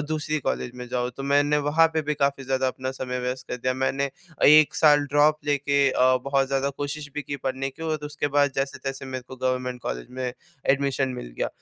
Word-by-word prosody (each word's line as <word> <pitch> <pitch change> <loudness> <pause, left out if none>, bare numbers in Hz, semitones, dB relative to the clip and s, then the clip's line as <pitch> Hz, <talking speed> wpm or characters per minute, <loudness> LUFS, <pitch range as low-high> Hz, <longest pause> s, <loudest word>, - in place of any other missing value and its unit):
दूसरी 155 0 -1
कॉलेज 120 - -2
में 125 0 -7
जाऊँ। 125 0 -1
तो 135 - -5
मैंने 145 +1 +3
वहाँ 165 +2 +5
पे 160 - +1
भी 150 0 -1
क़ाफी 140 -1 0
ज़्यादा 130 0 0
अपना 130 0 -3
समय 125 -1 -4
व्यस्त 125 +1 -4
कर - - -3
दिया 130 +1 -1
मैंने 135 +1 0 0.4
1 155 0 +7
साल 145 -2 +5
ड्रॉप 145 +2 +3
लेके 140 -1 +2
अ, 130 0 +4
बहुत 140 -1 +2
ज़्यादा 135 0 0
कोशिश 145 +1 -4
भी 150 - -3
की 140 0 -5
पढ़ने 135 0 -3
की 150 - -12
और 155 -2 -2
उसके 145 0 -2
बाद 145 -2 +4
जैसे-तैसे 135 0 -3
मेरे 130 -1 -5
को 130 - -9
गवर्नमेंट 125 -1 -2
कॉलेज - - -4
में 125 -1 -3 0.4
एडमिशन 135 -1 +1
मिल - - -8
गया। - - 0
135 Hz, 210 wpm, -25 LUFS, 130-145 Hz, 0.4 s, 1